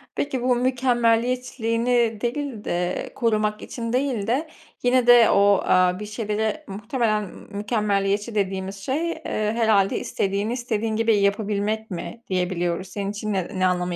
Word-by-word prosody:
Peki, 270 Hz, -3 st, -2 dB
bu 250 Hz, 0 st, +2 dB
mükemmeliyetçiliğini 240 Hz, -1 st, +1 dB
değil 245 Hz, -2 st, -3 dB
de, 175 Hz, +1 st, -2 dB
korumak 215 Hz, -3 st, 0 dB
için 230 Hz, -1 st, -5 dB
değil 255 Hz, -6 st, 0 dB
de, 275 Hz, +8 st, 0 dB, 0.4 s
yine 245 Hz, 0 st, +3 dB
de 240 Hz, -2 st, +8 dB
o, 200 Hz, 0 st, +5 dB
aaa, 185 Hz, 0 st, +3 dB
bir 210 Hz, -, -5 dB
şeylere, 215 Hz, 0 st, -2 dB
muhtemelen, 215 Hz, +1 st, -1 dB, 0.3 s
mükemmeliyetçi 205 Hz, 0 st, 0 dB
dediğimiz 190 Hz, -1 st, -1 dB
şey, 270 Hz, -, -2 dB
eee, -, -, -7 dB, 0.3 s
herhâlde 215 Hz, -4 st, +3 dB
istediğini 200 Hz, +3 st, -1 dB
istediğin 225 Hz, -3 st, -2 dB
gibi 225 Hz, 0 st, +3 dB
yapabilmek 205 Hz, +2 st, 0 dB
mi 230 Hz, +6 st, -6 dB
diyebiliyoruz. 180 Hz, -1 st, -1 dB
Senin 200 Hz, +1 st, -4 dB
için 210 Hz, 0 st, -3 dB
ne 185 Hz, +1 st, -3 dB
ne 185 Hz, -, +3 dB
anlamı 180 Hz, -1 st, -1 dB
215 Hz, 140 wpm, -23 LUFS, 200-240 Hz, 0.4 s, de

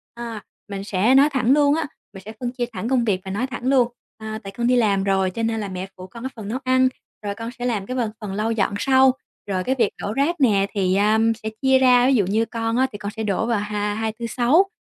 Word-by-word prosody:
À, 235 Hz, -3 st, -6 dB, 0.3 s
mình 200 Hz, -1 st, -5 dB
sẽ 210 Hz, +6 st, +2 dB
nói 280 Hz, +2 st, +6 dB
thẳng 255 Hz, -2 st, +1 dB
luôn 290 Hz, 0 st, +4 dB
á, 325 Hz, -1 st, -1 dB, 0.3 s
mình 195 Hz, -1 st, -11 dB
sẽ 215 Hz, -, -7 dB
phân 245 Hz, -1 st, -3 dB
chia 245 Hz, -1 st, -2 dB
thẳng 215 Hz, +4 st, -4 dB
công 255 Hz, -3 st, +2 dB
việc 190 Hz, -4 st, 0 dB
và 190 Hz, -, -5 dB
nói 230 Hz, +6 st, -1 dB
thẳng 245 Hz, -2 st, -7 dB
luôn, 260 Hz, -3 st, +4 dB, 0.3 s
à, 220 Hz, 0 st, -6 dB
tại 195 Hz, -, -7 dB
con 235 Hz, 0 st, 0 dB
đi 250 Hz, -, +4 dB
làm 205 Hz, -5 st, +2 dB
rồi 190 Hz, -1 st, +1 dB
cho 230 Hz, +4 st, -4 dB
nên 225 Hz, -1 st, 0 dB
là 205 Hz, -, -4 dB
mẹ 185 Hz, 0 st, -5 dB
phụ 185 Hz, 0 st, -9 dB
con 230 Hz, +5 st, -11 dB
cái 260 Hz, -, -3 dB
phần 220 Hz, -4 st, -8 dB
nấu 245 Hz, +5 st, -3 dB
ăn, 255 Hz, 0 st, +4 dB, 0.4 s
rồi 200 Hz, 0 st, -2 dB
con 230 Hz, +2 st, -6 dB
sẽ 245 Hz, -, -3 dB
làm 215 Hz, -5 st, -1 dB
cái 255 Hz, +4 st, -4 dB
phần 230 Hz, -4 st, -1 dB
phần 200 Hz, -2 st, -5 dB
lau 215 Hz, +3 st, -1 dB
dọn 200 Hz, -3 st, 0 dB
sau, 265 Hz, +1 st, +5 dB, 0.4 s
rồi 185 Hz, -2 st, -1 dB
cái 260 Hz, +7 st, 0 dB
việc 235 Hz, -6 st, +2 dB
đổ 205 Hz, -, -3 dB
rác 285 Hz, +7 st, +1 dB
nè 200 Hz, -6 st, +4 dB
thì, 190 Hz, -3 st, +1 dB
a, 210 Hz, +2 st, +3 dB, 0.2 s
sẽ 220 Hz, -, -2 dB
chia 265 Hz, -1 st, +4 dB
ra, 250 Hz, -1 st, +5 dB
ví 270 Hz, -, +4 dB
dụ 205 Hz, -, +3 dB
như 215 Hz, +4 st, +1 dB
con 230 Hz, 0 st, -2 dB
á 260 Hz, +1 st, +3 dB
thì 205 Hz, -, -7 dB
con 205 Hz, 0 st, -5 dB
sẽ 220 Hz, -, -3 dB
đổ 210 Hz, +1 st, 0 dB
vào 230 Hz, -3 st, +1 dB
ha 210 Hz, 0 st, -2 dB
Hai, 220 Hz, +1 st, -2 dB
Tư, 235 Hz, -, -3 dB
Sáu, 265 Hz, -, +3 dB
225 Hz, 280 wpm, -22 LUFS, 205-255 Hz, 0.4 s, nói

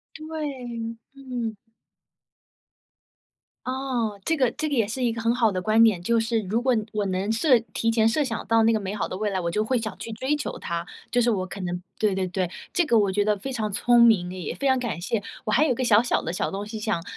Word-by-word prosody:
对， 265 Hz, -8 st, -5 dB, 0.2 s
嗯。 250 Hz, -5 st, -4 dB, 2.1 s
噢， 255 Hz, -5 st, -2 dB
这 325 Hz, -, +1 dB
个 255 Hz, -3 st, +3 dB
这 310 Hz, -, -2 dB
个 -, -, 0 dB
也 230 Hz, -5 st, +2 dB
是 250 Hz, +4 st, -3 dB
一 235 Hz, -, +2 dB
个 230 Hz, -, -5 dB
很 230 Hz, +1 st, +2 dB
好 230 Hz, -4 st, +2 dB
的 185 Hz, -, -1 dB
观 215 Hz, +4 st, +4 dB
点， 205 Hz, -6 st, +3 dB
就 230 Hz, +6 st, +2 dB
是 225 Hz, 0 st, +1 dB
如 225 Hz, +5 st, 0 dB
果 255 Hz, 0 st, +3 dB, 0.2 s
我 210 Hz, -1 st, -1 dB
能 190 Hz, +2 st, -1 dB
设 245 Hz, +3 st, +4 dB, 0.2 s
提 230 Hz, -, +1 dB
前 225 Hz, -1 st, +3 dB
设 290 Hz, +6 st, +1 dB
想 230 Hz, -4 st, -4 dB
到 225 Hz, 0 st, +4 dB
那 225 Hz, +1 st, +4 dB
个 220 Hz, -, +1 dB
美 195 Hz, 0 st, -4 dB
好 210 Hz, -, -1 dB
的 -, -, -5 dB
未 215 Hz, 0 st, 0 dB
来， 195 Hz, -2 st, -1 dB
我 170 Hz, -2 st, -1 dB
就 210 Hz, +5 st, 0 dB
会 245 Hz, +3 st, +1 dB
想 220 Hz, -3 st, -5 dB
去 230 Hz, -, -7 dB
追 260 Hz, +6 st, -1 dB
求 295 Hz, -, -4 dB
它， 170 Hz, 0 st, -4 dB, 0.2 s
就 245 Hz, -, +2 dB
是 240 Hz, 0 st, +3 dB
我 190 Hz, -4 st, -1 dB
可 195 Hz, +1 st, -8 dB
能 180 Hz, -1 st, -3 dB, 0.2 s
对 210 Hz, -3 st, +2 dB
对 190 Hz, -1 st, -1 dB
对， 185 Hz, -1 st, -2 dB, 0.2 s
这 350 Hz, -2 st, +2 dB
个 235 Hz, -6 st, +4 dB
我 200 Hz, -2 st, +2 dB
觉 205 Hz, +2 st, +2 dB
得 210 Hz, 0 st, +2 dB
非 265 Hz, +7 st, -5 dB
常 220 Hz, -4 st, -2 dB
聪 235 Hz, +4 st, +4 dB
明， 210 Hz, -7 st, +5 dB
也 185 Hz, -4 st, -5 dB
非 280 Hz, -, -3 dB
常 260 Hz, -1 st, +4 dB
感 240 Hz, -7 st, -3 dB
谢， 205 Hz, +5 st, -2 dB, 0.2 s
我 215 Hz, -, -1 dB
还 295 Hz, +8 st, +4 dB
有 275 Hz, -, +2 dB
一 -, -, 0 dB
个 255 Hz, -, -2 dB
小 225 Hz, -2 st, +5 dB
小 245 Hz, -, 0 dB
的 165 Hz, -, -3 dB
小 180 Hz, -, -1 dB
东 200 Hz, +1 st, -4 dB
西 220 Hz, 0 st, -6 dB
想 215 Hz, -6 st, -1 dB
225 Hz, 270 characters per minute, -25 LUFS, 205-245 Hz, 2.1 s, 明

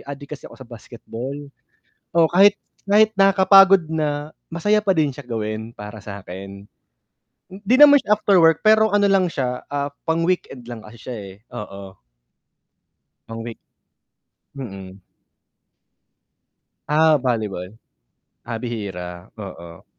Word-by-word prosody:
adik 140 Hz, +1 st, -8 dB
kasi -, -, -13 dB
ako -, -, -14 dB
sa 130 Hz, -, -15 dB
basketball. 120 Hz, +2 st, -8 dB, 0.8 s
Oh, 165 Hz, -1 st, +5 dB
kahit, 200 Hz, +4 st, +5 dB, 0.3 s
kahit 215 Hz, +2 st, +4 dB
nakakapagod 195 Hz, -1 st, +6 dB
na, 150 Hz, -1 st, -2 dB, 0.2 s
masaya 210 Hz, +5 st, +1 dB
pa 195 Hz, -, +3 dB
din 155 Hz, -2 st, +2 dB
siya 140 Hz, +1 st, -11 dB
gawin 110 Hz, 0 st, -4 dB
para 105 Hz, +1 st, -9 dB
sakin. 100 Hz, -1 st, -9 dB, 0.8 s
'Di 200 Hz, +6 st, 0 dB
naman 290 Hz, -1 st, +9 dB
siya 210 Hz, -, -1 dB
after 200 Hz, -2 st, +2 dB
work 165 Hz, -1 st, +4 dB
pero 220 Hz, 0 st, +4 dB
ano 205 Hz, 0 st, +3 dB
lang 195 Hz, -2 st, +3 dB
siya, 125 Hz, -3 st, -3 dB
ah, 140 Hz, 0 st, -1 dB, 0.2 s
pang 165 Hz, 0 st, 0 dB
weekend 135 Hz, -9 st, -3 dB
lang 115 Hz, -2 st, -8 dB
kasi 110 Hz, +2 st, -14 dB
siya 125 Hz, -2 st, -7 dB
eh, 100 Hz, -2 st, -9 dB, 0.2 s
oo. 100 Hz, -2 st, -9 dB, 1.3 s
Pang 115 Hz, 0 st, -7 dB
week, 115 Hz, 0 st, -8 dB, 1.0 s
mm. 95 Hz, -7 st, -9 dB, 1.8 s
Ah, 155 Hz, 0 st, +4 dB
volleyball. 110 Hz, -6 st, -3 dB, 0.7 s
Ah, 120 Hz, -1 st, -5 dB
bihira, 95 Hz, -7 st, -6 dB
oo. 85 Hz, -5 st, -10 dB
130 Hz, 125 wpm, -21 LUFS, -, 1.8 s, naman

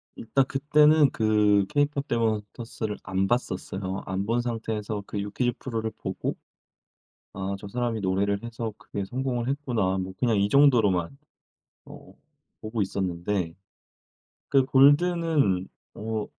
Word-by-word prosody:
일단 130 Hz, +4 st, +1 dB
그때는 150 Hz, +2 st, +4 dB
그 105 Hz, -2 st, +3 dB
케이팝 145 Hz, -1 st, 0 dB
데몬 115 Hz, -3 st, +2 dB, 0.2 s
헌터스를 115 Hz, -3 st, -5 dB
안 95 Hz, +1 st, 0 dB
봤었어요. 95 Hz, -4 st, -2 dB
안 95 Hz, +1 st, -2 dB
본 115 Hz, +3 st, +1 dB
상태에서 110 Hz, -3 st, -3 dB
그 105 Hz, -, -4 dB
유퀴즈 105 Hz, +5 st, -1 dB
프로를 115 Hz, -4 st, -3 dB
보고 -, -, -3 dB, 1.0 s
'아 100 Hz, 0 st, -3 dB
저 100 Hz, -, -9 dB
사람이 120 Hz, 0 st, -2 dB
노래를 100 Hz, +2 st, 0 dB
해서 115 Hz, -1 st, -5 dB
크게 100 Hz, -1 st, -5 dB
성공을 125 Hz, +1 st, -2 dB
했구나.' 120 Hz, -9 st, 0 dB
뭐 95 Hz, 0 st, -5 dB
그냥 115 Hz, -4 st, +2 dB
이 100 Hz, +1 st, +2 dB
정도로만 115 Hz, -7 st, +3 dB, 0.7 s
어 -, -, -13 dB, 0.5 s
보고 110 Hz, 0 st, -2 dB
있었는데 90 Hz, -2 st, -2 dB, 1.0 s
그 135 Hz, -2 st, +4 dB
골든은 145 Hz, -, +3 dB, 0.3 s
어 110 Hz, -1 st, -3 dB
110 Hz, 265 characters per minute, -26 LUFS, 100-130 Hz, 1.0 s, 그때는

